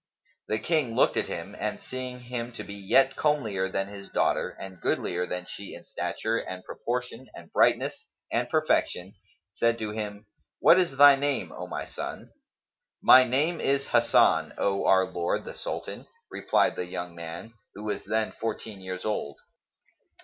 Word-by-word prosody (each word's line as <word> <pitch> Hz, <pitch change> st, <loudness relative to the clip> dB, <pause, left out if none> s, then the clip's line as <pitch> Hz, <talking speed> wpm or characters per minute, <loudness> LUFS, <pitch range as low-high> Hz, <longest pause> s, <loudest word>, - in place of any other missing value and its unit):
The 110 Hz, -, 0 dB
King 130 Hz, -1 st, 0 dB
looked -, -, +4 dB
at -, -, 0 dB
him 95 Hz, +5 st, -6 dB
and 105 Hz, 0 st, -2 dB
seeing 130 Hz, -1 st, -7 dB
him 120 Hz, -1 st, -5 dB
to -, -, -7 dB
be 100 Hz, -, -8 dB
yet 100 Hz, +7 st, +3 dB
comelier 110 Hz, -11 st, 0 dB
than 95 Hz, 0 st, -1 dB
his 100 Hz, -1 st, -10 dB
daughter -, -, +1 dB
and 95 Hz, -2 st, -10 dB
goodlier 90 Hz, 0 st, -1 dB
than 90 Hz, 0 st, -3 dB
she 100 Hz, +2 st, -8 dB
in -, -, -12 dB
stature 115 Hz, +1 st, -2 dB
and 95 Hz, 0 st, -7 dB
proportion 125 Hz, +1 st, -4 dB
and -, -, -12 dB
brightness -, -, +2 dB, 0.2 s
and -, -, 0 dB
perfection, 90 Hz, +2 st, +1 dB, 0.4 s
said 115 Hz, +4 st, +1 dB
to 110 Hz, -2 st, -4 dB
him, 105 Hz, -1 st, -5 dB, 0.3 s
"What 175 Hz, -, +7 dB
is 170 Hz, -8 st, 0 dB
thy 145 Hz, 0 st, +9 dB
name, 140 Hz, -1 st, -1 dB
O -, -, -7 dB
my -, -, -4 dB
son?" -, -, -7 dB, 0.7 s
"My 130 Hz, 0 st, +8 dB
name 150 Hz, +7 st, +1 dB
is 140 Hz, 0 st, 0 dB
Hasan, 115 Hz, -9 st, +4 dB
O 100 Hz, 0 st, 0 dB
our 95 Hz, 0 st, +5 dB
lord 90 Hz, -2 st, -2 dB
the -, -, -7 dB
Sultan," -, -, -6 dB, 0.2 s
replied -, -, +2 dB
the 90 Hz, -, -3 dB
young 90 Hz, -1 st, -5 dB
man, 85 Hz, +6 st, -8 dB, 0.2 s
who 105 Hz, -, -8 dB
was 105 Hz, -1 st, -3 dB
then 110 Hz, 0 st, -1 dB
fourteen 110 Hz, -2 st, -5 dB
years 95 Hz, 0 st, -6 dB
old. 105 Hz, -9 st, -2 dB
110 Hz, 165 wpm, -27 LUFS, 95-125 Hz, 0.7 s, thy